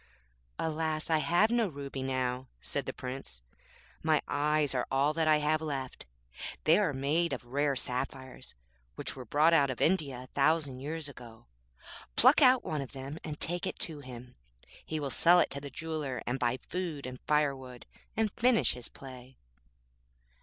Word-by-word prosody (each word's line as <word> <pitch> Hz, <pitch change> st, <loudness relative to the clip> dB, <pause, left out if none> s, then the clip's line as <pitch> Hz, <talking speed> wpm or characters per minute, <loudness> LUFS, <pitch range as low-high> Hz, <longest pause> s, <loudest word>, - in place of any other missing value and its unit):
'Alas! 160 Hz, 0 st, -1 dB
I 160 Hz, -, +4 dB
have 175 Hz, +8 st, +3 dB
no 235 Hz, -2 st, +3 dB
ruby 140 Hz, -4 st, -6 dB
now,' 130 Hz, -1 st, -1 dB
said -, -, -3 dB
the -, -, -1 dB
Prince; 125 Hz, -, -7 dB, 0.6 s
'my 155 Hz, -1 st, +3 dB
eyes 150 Hz, 0 st, +1 dB
are 125 Hz, -1 st, -1 dB
all 140 Hz, +3 st, +2 dB
that 160 Hz, 0 st, +1 dB
I 155 Hz, -1 st, +6 dB
have 150 Hz, +1 st, +1 dB
left. 135 Hz, -, -4 dB, 0.6 s
They 165 Hz, +5 st, +5 dB
are 200 Hz, -7 st, +2 dB
made 145 Hz, +5 st, +1 dB
of 125 Hz, -1 st, -7 dB
rare 145 Hz, 0 st, +2 dB
sapphires, 130 Hz, -, -4 dB, 0.4 s
which -, -, -4 dB
were 130 Hz, -2 st, -8 dB
brought 150 Hz, +8 st, +4 dB
out 140 Hz, -4 st, +5 dB
of 130 Hz, -, -4 dB
India 145 Hz, -8 st, +1 dB
a -, -, -13 dB
thousand 145 Hz, -2 st, +2 dB
years 155 Hz, +3 st, -4 dB
ago. 120 Hz, -5 st, -12 dB, 0.7 s
Pluck -, -, +6 dB
out 255 Hz, 0 st, +7 dB
one 155 Hz, -5 st, -2 dB
of 135 Hz, -, -8 dB
them 135 Hz, +3 st, -6 dB
and 150 Hz, -2 st, -6 dB
take 175 Hz, +1 st, 0 dB
it -, -, -4 dB
to 155 Hz, -3 st, -2 dB
him. 125 Hz, -2 st, -10 dB, 0.5 s
He 155 Hz, -, -3 dB
will 140 Hz, -2 st, -3 dB
sell 175 Hz, +8 st, +5 dB
it -, -, +2 dB
to 140 Hz, -, -2 dB
the 140 Hz, -, -7 dB
jeweller, 150 Hz, -3 st, -4 dB
and 125 Hz, +2 st, -2 dB
buy 125 Hz, 0 st, +1 dB
food 170 Hz, -6 st, -3 dB
and 130 Hz, 0 st, -7 dB
firewood, 135 Hz, -5 st, 0 dB, 0.3 s
and 220 Hz, -2 st, +2 dB
finish 245 Hz, -1 st, +3 dB
his 125 Hz, -1 st, -8 dB
play.' 130 Hz, -1 st, -11 dB
145 Hz, 175 wpm, -31 LUFS, 130-160 Hz, 0.7 s, out